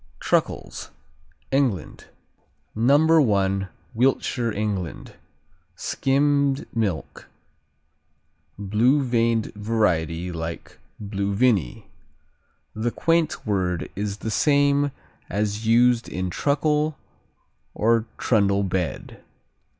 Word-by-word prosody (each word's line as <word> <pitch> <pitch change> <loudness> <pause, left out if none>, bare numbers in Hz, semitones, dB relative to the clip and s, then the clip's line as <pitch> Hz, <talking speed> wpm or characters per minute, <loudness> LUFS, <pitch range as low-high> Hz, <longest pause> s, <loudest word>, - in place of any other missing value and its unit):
Truckles - - -1 0.6
England 130 - -1 0.7
No. 145 0 +4
I: 95 0 0 0.3
Wiltshire, 120 -1 +1
England. 100 -5 -4 0.6
Skimmed 140 +4 +1
milk; 100 -8 -3 1.3
blue 115 +8 +2
veined 115 -3 +1
variety 90 -6 0
like 80 0 -6 0.2
Blue 100 -1 -3
Vinny. 110 -2 +1 0.9
The 110 +2 -1
quaint 165 +4 0
word 95 -5 -1
is 100 0 -3
the 110 - -4
same 145 +1 +3 0.4
as 105 +2 -2
used 120 +1 +4
in 90 0 -3
truckle 150 - 0 0.8
or 115 +1 +2
trundle 100 -3 +2
bed. 95 -2 -3
110 Hz, 80 wpm, -24 LUFS, 100-135 Hz, 1.3 s, No